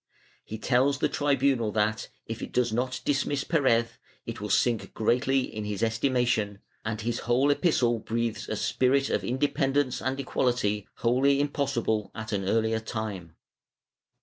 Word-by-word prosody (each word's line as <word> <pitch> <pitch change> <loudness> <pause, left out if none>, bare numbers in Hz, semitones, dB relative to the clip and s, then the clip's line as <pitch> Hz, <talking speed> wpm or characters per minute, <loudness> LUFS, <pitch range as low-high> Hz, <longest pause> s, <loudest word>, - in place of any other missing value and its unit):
He 110 - -7
tells 130 +4 +2
the - - +1
tribunal 135 -5 +1
that, 110 0 0 0.2
if 115 0 -6
it - - -6
does 120 -2 +1
not 125 +2 -1
dismiss 140 0 0
Perez 130 -8 +3 0.4
it - - -6
will - - -4
sink 120 -3 +1
greatly 125 +4 +2
in 110 -4 -5
his 105 -1 -3
estimation, 115 -3 +1 0.3
and 110 -1 -3
his 115 +1 -2
whole 130 +4 +2
epistle 125 -7 +2
breathes 115 0 -3
a - - -1
spirit 135 +2 +1
of - - 0
inde 130 +4 0
pendence 135 -1 +1
and 130 +1 -1
equality 120 -6 0
wholly 130 +4 +2
impossible 135 -7 0
at 110 0 -6
an 100 -2 -1
earlier 110 0 +1
time. 105 -7 -5
120 Hz, 150 wpm, -27 LUFS, 110-135 Hz, 0.4 s, Perez